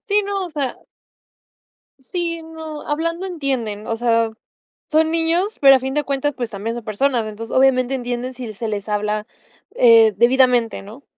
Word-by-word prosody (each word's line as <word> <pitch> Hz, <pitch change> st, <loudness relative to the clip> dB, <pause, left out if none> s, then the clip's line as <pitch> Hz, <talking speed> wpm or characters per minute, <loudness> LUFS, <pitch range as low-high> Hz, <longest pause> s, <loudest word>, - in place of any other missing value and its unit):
Sí, 415 Hz, 0 st, +3 dB
no, 395 Hz, -1 st, -2 dB
o -, -, -11 dB
sea 285 Hz, -5 st, -3 dB, 1.2 s
sí, 335 Hz, +3 st, -4 dB
no, 320 Hz, -2 st, -8 dB
hablando 335 Hz, +4 st, -2 dB
entienden, 260 Hz, -, -3 dB
o 225 Hz, -, -1 dB
sea, 230 Hz, -1 st, +2 dB, 0.6 s
son 315 Hz, +1 st, +3 dB
niños, 335 Hz, +6 st, 0 dB
pero 275 Hz, -1 st, +8 dB
a -, -, +2 dB
fin 265 Hz, +1 st, -4 dB
de 295 Hz, +1 st, 0 dB
cuentas, 280 Hz, +1 st, -1 dB
pues, 240 Hz, -3 st, -4 dB
también 220 Hz, +2 st, -4 dB
son 240 Hz, -, -6 dB
personas, 230 Hz, +3 st, 0 dB
entonces, 220 Hz, +1 st, -7 dB
obviamente, 260 Hz, -1 st, +3 dB
entienden 245 Hz, 0 st, -3 dB
si 245 Hz, -3 st, -7 dB
se 225 Hz, +3 st, -5 dB
les 210 Hz, -1 st, -4 dB
habla, 210 Hz, 0 st, -1 dB, 0.5 s
eh, 230 Hz, -, +6 dB
debidamente, 245 Hz, 0 st, +3 dB
¿no? 220 Hz, +8 st, -12 dB
255 Hz, 165 wpm, -20 LUFS, 230-310 Hz, 1.2 s, pero